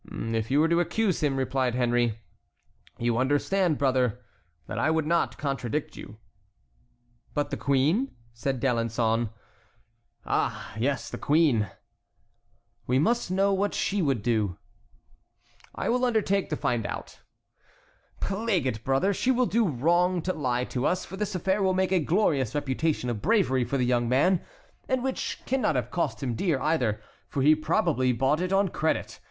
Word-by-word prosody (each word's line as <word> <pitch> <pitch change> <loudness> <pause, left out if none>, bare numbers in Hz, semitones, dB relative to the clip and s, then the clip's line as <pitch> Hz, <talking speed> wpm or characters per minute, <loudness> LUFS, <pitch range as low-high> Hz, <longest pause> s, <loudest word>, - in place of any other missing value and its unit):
"If 115 -1 -3
you 140 +2 +3
were 160 - +4
to 170 +1 +2
accuse 185 +3 0
him," 140 -3 +1
replied 130 -2 0
Henry, 120 -2 +1 0.8
"you 120 0 0
understand, 150 +5 +1
brother, 130 -4 +1 0.5
that 105 - -4
I 135 - +2
would 160 -1 +1
not 170 +2 +1
contradict 140 0 -3
you." 105 - -10 1.2
"But 145 -1 -1
the - - -2
queen?" 150 - +1 0.2
said 130 +3 -2
D'Alençon. 115 -2 0 1.0
"Ah, - - -1
yes, 130 +3 -1
the - - -6
queen." 145 - +2 1.2
"We 125 - +2
must 230 - +1
know 195 +2 +2
what 200 +1 0
she 200 0 0
would 135 - 0
do." 110 -6 0 1.2
"I - - -3
will 250 +1 +1
undertake 215 -5 +1
to 155 - -1
find 120 -7 -1
out." - - -7 1.0
"Plague 195 - 0
it, 115 -4 -2
brother! 135 +10 +2
she 245 - -1
will 255 -1 +3
do 230 -1 +2
wrong 175 +5 +2
to 185 - -1
lie 125 -5 -1
to 125 0 -3
us, 180 - 0
for 190 - -8
this 205 0 -3
affair 190 +3 0
will 190 -1 +2
make 190 0 +1
a 185 - +4
glorious 150 - +1
reputation 145 0 -1
of 110 -3 -5
bravery 185 - +2
for 125 +4 -2
the 125 - +1
young 120 -1 +1
man, 165 +8 +3 0.5
and 260 -1 +1
which, 265 -1 -3
cannot 260 - +1
have 125 - -2
cost 170 -4 -2
him 125 -3 -1
dear 155 - 0
either, 125 -10 0 0.3
for 135 - -1
he 150 +2 +7
probably 155 -4 +1
bought 135 +6 +1
it 185 0 -2
on 195 +1 +3
credit. 160 0 -2
145 Hz, 160 wpm, -27 LUFS, 125-185 Hz, 1.2 s, he